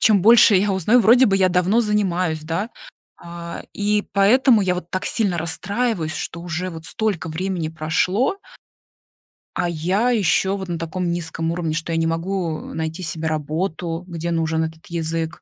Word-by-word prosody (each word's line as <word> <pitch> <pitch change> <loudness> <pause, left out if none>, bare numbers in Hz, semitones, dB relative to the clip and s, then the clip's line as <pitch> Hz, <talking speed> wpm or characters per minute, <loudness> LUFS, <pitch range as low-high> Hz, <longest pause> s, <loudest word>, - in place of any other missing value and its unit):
чем 210 -3 +4
больше 220 0 +7
я 200 +1 +2
узнаю 210 +7 +3
вроде 245 +3 +6
бы 195 -3 +2
я 185 -1 +4
давно 180 +6 +2
занимаюсь, 185 -7 0
да, 170 +8 -2 0.5
а, 170 0 -8
и 210 0 +1
поэтому 220 +3 +5
я 185 -2 +1
вот 180 -1 -6
так 185 - -3
сильно 200 -7 0
расстраиваюсь, 185 +1 -1
что 170 - -5
уже 175 +1 -3
вот 160 -2 -9
столько 200 -2 -1
времени 175 0 -2
прошло 170 - 0 1.2
а 175 - 0
я 185 +9 0
ещё 195 -2 +2
вот 190 -1 -6
на 170 - -2
таком 170 +2 -3
низком 165 -1 -3
уровне, 165 -2 -2
что 165 +1 -3
я 165 - 0
не 165 - +1
могу 165 -1 -3
найти 160 +2 -4
себе 160 -1 -3
работу, 165 +2 -3
где 170 -1 -4
нужен 160 -1 0
этот 160 0 -7
язык. 165 -1 -3
175 Hz, 165 wpm, -21 LUFS, 165-200 Hz, 1.2 s, больше